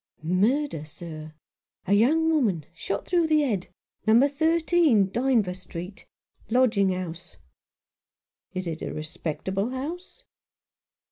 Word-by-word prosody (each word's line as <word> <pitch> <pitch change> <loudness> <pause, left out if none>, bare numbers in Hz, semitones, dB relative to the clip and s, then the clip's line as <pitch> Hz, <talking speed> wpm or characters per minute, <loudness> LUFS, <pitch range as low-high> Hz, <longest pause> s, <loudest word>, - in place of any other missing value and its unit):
"Murder, 200 - +1
sir. 155 0 -9 0.5
A 200 - +1
young 295 +10 +4
woman 210 - +1
— - - -38
shot 195 +4 -4
through 345 -2 +2
the 310 -1 +4
head 210 -10 -1 0.2
— - - -36
number 235 +6 +6
thirteen, 320 - +3
Dynevor 235 -6 +1
Street 185 +1 -9 0.2
— - - -55
lodging 225 -5 +3
house." 175 - -5 1.2
"Is 185 0 -3
it 165 -2 -4
a - - -4
respectable 170 +6 -3
house 330 - -6
210 Hz, 125 wpm, -26 LUFS, 180-285 Hz, 1.2 s, number